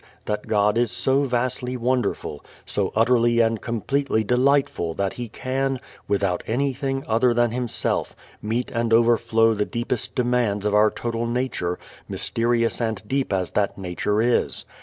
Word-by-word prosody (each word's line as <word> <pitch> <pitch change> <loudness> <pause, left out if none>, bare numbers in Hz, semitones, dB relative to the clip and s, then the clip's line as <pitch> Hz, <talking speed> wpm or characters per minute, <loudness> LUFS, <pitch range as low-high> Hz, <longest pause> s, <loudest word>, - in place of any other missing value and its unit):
that 105 0 -3
God 105 +1 +2
is 120 -1 +2
so 135 +1 +1
vastly 125 0 -1
wonderful, 125 - -1 0.2
so - - -1
utterly 120 +1 +3
and 115 -1 +2
completely 120 +1 0
delightful 125 - +1
that 100 -1 -1
He 120 -2 -6
can, 135 +3 -2 0.3
without 100 -3 0
anything 135 +2 -1
other 115 +2 +3
than 120 -1 +2
Himself, 120 -1 -2 0.3
meet 115 +3 -2
and 115 -1 0
overflow 115 -1 +4
the 105 -1 0
deepest 120 +1 -3
demands 120 -5 +1
of 105 - +1
our 105 +1 +5
total 115 +1 -3
nature, 120 -8 -1 0.3
mysterious 115 0 0
and 110 -2 -2
deep 135 -1 -1
as 95 -2 -1
that 100 -1 0
nature 100 +3 -1
is. 120 0 0
115 Hz, 145 wpm, -23 LUFS, 105-125 Hz, 0.3 s, our